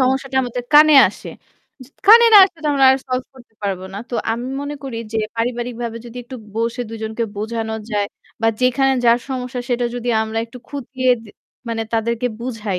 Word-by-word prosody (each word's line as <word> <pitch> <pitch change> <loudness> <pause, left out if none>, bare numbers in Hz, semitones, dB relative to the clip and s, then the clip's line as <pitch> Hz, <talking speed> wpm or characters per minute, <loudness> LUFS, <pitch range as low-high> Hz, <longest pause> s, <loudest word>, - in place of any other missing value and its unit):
সমস্যাটা 265 +1 0
আমাদের 245 0 -4
কানে 305 +1 +8
আসে। - - -10 0.5
য - - -14 0.2
কানে 465 +3 +9
না - - +10
আসলে 365 -3 -7
তো - - +1
আমরা 275 -1 +3
আর 265 - +3
solve 255 0 -2
করতে 240 -3 -18
পারবো 190 -2 -3
না। 200 - -4
তো 245 - -4 0.2
আমি 235 +2 -4
মনে 285 +1 -5
করি 265 -4 -6 0.2
যে, 220 - 0 0.2
পারিবারিকভাবে 235 0 -3
যদি 235 - -11
একটু 255 +2 -9 0.2
বসে 230 +2 -1
২ 225 - -7
জনকে 220 +1 -2
বোঝানো 220 +1 -3 0.2
যায় 205 -2 0 0.4
বা 225 - +4
যেখানে 270 +2 +3
যার 235 0 +5
সমস্যা 250 -1 -4
সেটা 245 -1 0
যদি 245 0 -4
আমরা 220 0 -3
একটু 235 +2 -12
খুঁটিয়ে 260 -2 -2
দে 215 - -14 0.4
মানে 225 -1 -2
তাদেরকে 230 +2 0
বুঝাই, 225 -6 -3
240 Hz, 190 wpm, -19 LUFS, 225-260 Hz, 0.5 s, না